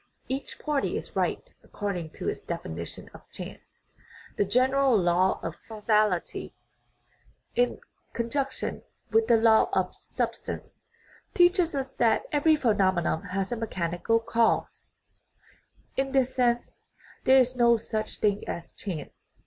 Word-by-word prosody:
Each 265 +2 -4
party 295 -3 -1
is - - -8
right - - -1 0.2
according 190 -6 -4
to - - -6
its - - -2
definition 85 - -6
of - - -15
chance. - - -11 0.5
The 205 - +2
general 255 +3 +3
law 180 0 +2
of 165 - -3
causality, 210 -4 0 1.0
taken 245 0 +2
in - - -21 0.3
con 235 0 -3
junction 275 -2 -2 0.3
with 450 0 +3
the 230 - +6
law 225 +6 +5
of - - 0
substance, - - -5 0.6
teaches 350 -2 +4
us 270 -1 -2
that 230 -4 +2
every 305 +2 +4
phenomenon 190 - +2
has 195 +2 -2
a - - 0
mechanical 205 -1 0
cause; 230 0 0 1.0
in 270 0 -1
this 260 -1 +2
sense 240 -2 0 0.4
there 265 +1 +7
is 255 -1 +3
no 235 -1 +5
such 215 -1 -4
thing 205 -1 +1
as 170 - -5
chance. 165 -8 -8
230 Hz, 135 wpm, -27 LUFS, 195-265 Hz, 1.0 s, there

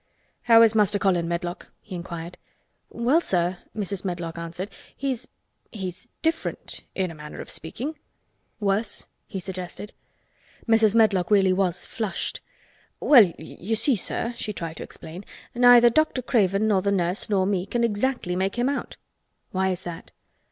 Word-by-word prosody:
"How 230 0 +9
is 225 -1 +5
Master 210 -2 +3
Colin, 180 -4 +1
Medlock?" 175 +1 -3
he 210 - -12
inquired. 170 -1 -6 0.5
"Well, 255 +8 +2
sir," 180 - 0 0.2
Mrs. 200 -2 -1
Medlock 175 -3 -4
answered, 170 +4 -6 0.3
"he's—he's 225 -6 -6 0.2
different, 325 0 -2
in 185 -3 -1
a - - -9
manner 150 -1 -9
of - - -7
speaking." 270 - -5 0.6
"Worse?" 205 +1 -1 0.2
he 195 - -5
suggested. 185 +2 -6 0.7
Mrs. 225 -2 +4
Medlock 200 -6 +4
really 195 -3 +5
was 185 -2 0
flushed. 220 -4 -4 0.6
"Well, 230 - +7
you 190 +7 -4
see, 235 +4 +3
sir," 230 +4 -1
she 215 -2 -3
tried 165 -3 -5
to - - -4
explain, 170 +4 -10 0.3
"neither 245 -1 +7
Dr. 310 -2 +2
Craven, 205 -4 +2
nor 200 -3 +3
the 200 +1 +1
nurse, 180 +1 0
nor 195 -3 +2
me 190 -1 0
can 240 -1 0
exactly 225 -4 0
make 190 +2 0
him 245 +2 +2
out." 280 - -4 0.5
"Why 190 0 +1
is 185 0 -3
that?" 170 -2 -8
195 Hz, 150 wpm, -25 LUFS, 180-230 Hz, 0.7 s, How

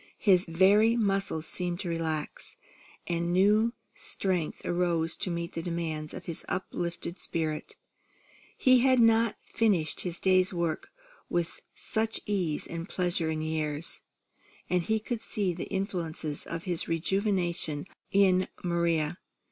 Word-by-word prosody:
His 185 -3 +4
very 200 +7 +5
muscles 195 -7 0
seemed 175 0 -2
to 180 - -3
relax, 160 -2 -3 0.5
and 170 0 -1
new 210 +5 +4 0.2
strength 180 -5 -1
arose 175 -2 +1
to - - -2
meet 170 0 -3
the 165 - -3
demands 165 -3 -3
of - - -8
his 170 0 -4
uplifted 175 -1 -3
spirit. 155 -2 -1 0.8
He 255 -1 +6
had 255 0 +4
not 225 -1 +5
finished 190 -9 +1
his 175 -2 -3
day's 185 -1 +4
work 170 -2 -1 0.4
with 175 -1 -1
such 220 0 -1
ease 180 -7 -1
and 170 +2 -6
pleasure 175 -3 0
in 155 0 -2
years; 155 0 -2 0.7
and 180 -1 +3
he 220 +6 +1
could 225 +1 -4
see 200 -5 -1
the 170 - -5
influence 170 -6 -3
of 165 0 -4
his 175 -3 -1
rejuvenation 175 -3 0 0.2
in 185 -2 +4 0.2
Maria. 170 -2 +1
175 Hz, 130 wpm, -29 LUFS, 165-195 Hz, 0.8 s, He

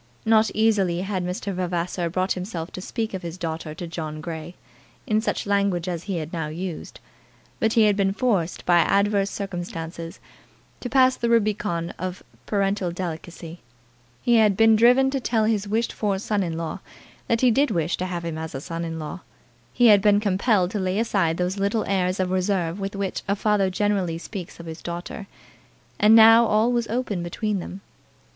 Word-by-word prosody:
Not 220 0 +4
easily 200 -6 +2
had 190 -1 -2
Mr. 180 +2 -3
Vavasor 175 -1 -2
brought 185 +2 -1
himself 180 -3 -4
to 185 - -7
speak 225 +2 -4
of 190 - -4
his 170 -1 -6
daughter 160 -3 -5
to 175 - -6
John 160 -2 -5
Grey, 160 +1 -7 0.5
in 215 -3 +1
such - - -2
language 200 -4 0
as 175 -2 -4
he 195 -3 -2
had 160 0 -5
now 165 -3 -2
used; 170 +2 -6 0.6
but 220 0 +1
he 225 - +5
had 210 -1 +4
been 195 -1 +1
forced 195 -6 -1
by 175 -1 +5
adverse 200 +2 +2
circumstances 170 -4 -6 0.6
to 245 - -5
pass 260 0 +4
the 235 - -1
Rubicon 210 -7 0
of 185 +1 -5 0.2
parental 195 -2 0
delicacy; 170 -1 -6 0.6
he 240 -1 +4
had 210 -3 +4
been 225 0 +6
driven 250 +4 +5
to 270 - -1
tell 230 -3 +1
his 210 -2 0
wished 225 +3 -1
for 205 -3 -1
son 205 +1 -1
in 165 -3 -3
law 165 +3 -4 0.5
that 230 0 +1
he 255 -2 +5
did 280 +6 +2
wish 165 0 0
to 185 - -3
have 175 -2 -4
him 160 -1 -4
as 160 -2 -6
a - - -3
son 165 +2 -5
in 165 -1 -4
law; 155 +3 -6 0.5
he 245 - +2
had 205 -3 +7
been 205 0 +4
compelled 200 -2 +1
to 210 - -2
lay 185 0 -1
aside 195 -7 +1
those 180 +2 -1
little 200 +3 0
airs 185 -1 0
of 185 -1 0
reserve 185 -1 0
with 195 +1 -4
which 195 -1 -3
a 200 - +1
father 205 -2 +1
generally 190 -3 0
speaks 180 0 -8
of 170 - -9
his 160 0 -8
daughter, 175 +4 -6 0.7
and 215 +1 +6
now 225 +1 +8
all 215 +3 +3
was 240 -1 0
open 225 -5 -2
between 200 +4 -2
them. 185 +2 -8
190 Hz, 190 wpm, -24 LUFS, 175-215 Hz, 0.7 s, now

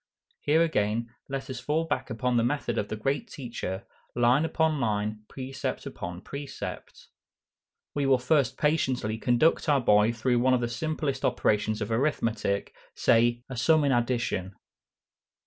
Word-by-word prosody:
Here 160 +3 +3
again 115 -6 0 0.2
let 135 0 -4
us 130 -3 -5
fall 150 +5 0
back 145 -3 -2
upon 125 +1 -1
the 115 - +3
method 120 -2 -1
of 105 - -2
the 110 - -4
great 135 +7 -1
Teacher, 115 -7 -5 0.3
"Line 120 +5 +4
upon 160 -2 +1
line, 105 -1 -1
precept 135 0 -5
upon 90 +1 -6
precept." 140 0 -7 0.8
We 145 -1 0
will 135 -1 +5
first 135 +1 +1
patiently 130 -8 0
conduct 130 +8 +2
our 145 -2 +4
boy 105 -2 +4
through 120 +1 +1
one 130 +1 +4
of 125 - 0
the 120 - -1
simplest 140 +1 -2
operations 105 +1 +1
of 105 - -5
arithmetic, 115 -6 0 0.2
say, 120 +1 +3
a 130 - -6
sum 155 +5 +4
in 140 - +2
addition. 120 -6 0
125 Hz, 150 wpm, -27 LUFS, 110-140 Hz, 0.8 s, will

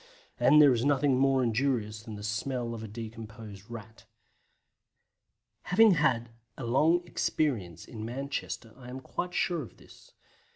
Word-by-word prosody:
And 130 +5 +6
there 145 -3 +8
is 120 -1 0
nothing 140 -2 +3
more 135 -1 +3
injurious 115 -3 0
than 110 -2 -8
the 105 - -8
smell 115 +2 -2
of 115 - -6
a 110 - -6
decomposed 110 -2 -9
Rat. 110 -2 -10 1.6
Having 220 +4 +6
had 130 -9 +2 0.3
a - - -6
long 160 +9 +3
experience 110 - -1
in 110 -2 -8
Manchester 125 -1 -4
I 125 -2 -11
am 130 +1 -6
quite 180 +6 -5
sure 175 -3 +1
of 125 - -11
this. - - -18
120 Hz, 150 wpm, -29 LUFS, 110-140 Hz, 1.6 s, there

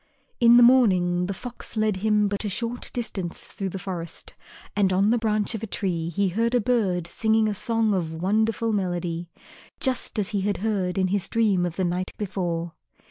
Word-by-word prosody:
In 235 0 +7
the 245 - +8
morning 185 -8 +4
the 200 - -2
Fox 245 -1 -9
led 215 -2 +1
him 210 +1 +2
but 200 +1 -2
a 210 - -2
short 235 +4 -3
distance 195 -8 -4
through 195 -1 -4
the 190 - -5
forest 180 -3 -6 0.4
and 200 -2 +2
on 195 +3 +3
the 240 - +3
branch 215 -1 0
of 220 - -4
a 225 - -4
tree 170 -5 -2
he 195 +3 0
heard 230 +6 0
a - - +4
bird 210 -7 +1
singing 220 +4 +2
a 210 - 0
song 225 +1 +1
of 165 -4 -2
wonderful 220 +5 0
melody, 175 -3 -2 0.5
just 260 -4 0
as 205 -2 +2
he 205 -2 -1
had 200 +1 0
heard 190 -5 -1
in 185 -1 +2
his 195 0 -1
dream 205 -6 +2
of 170 - -6
the 185 - 0
night 180 +1 -2
before. 175 -4 -3
200 Hz, 195 wpm, -25 LUFS, 180-220 Hz, 0.5 s, the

